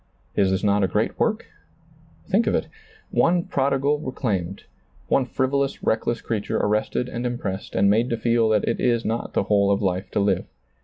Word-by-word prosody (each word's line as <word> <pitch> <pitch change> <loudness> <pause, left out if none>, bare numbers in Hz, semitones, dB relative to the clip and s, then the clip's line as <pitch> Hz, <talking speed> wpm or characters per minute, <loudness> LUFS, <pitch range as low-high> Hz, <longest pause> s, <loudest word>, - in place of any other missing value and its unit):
Is 95 - +3
this 95 +2 0
not 100 0 +3
a - - +3
great 105 +4 -1
work? 220 0 0 0.8
Think - - +2
of - - +2
it. - - -1 0.4
One 175 0 +3
prodigal 140 +1 +1
re 130 - -5
claimed, 100 -10 -3 0.5
one 130 -2 +2
frivolous, 135 +2 -1
reckless 115 +1 0
creature 110 -3 -2
arrested 105 +4 0
and 120 -1 -5
impressed 115 -6 -4
and 100 - +3
made 115 +5 +3
to 115 - -1
feel 115 -1 +2
that 105 -1 +2
it - - 0
is 120 -2 +1
not 115 +1 -2
the - - +1
whole 100 -1 +2
of 100 - +2
life 95 +1 -1
to - - +1
live. 100 0 +1
115 Hz, 190 wpm, -23 LUFS, 100-130 Hz, 0.8 s, Is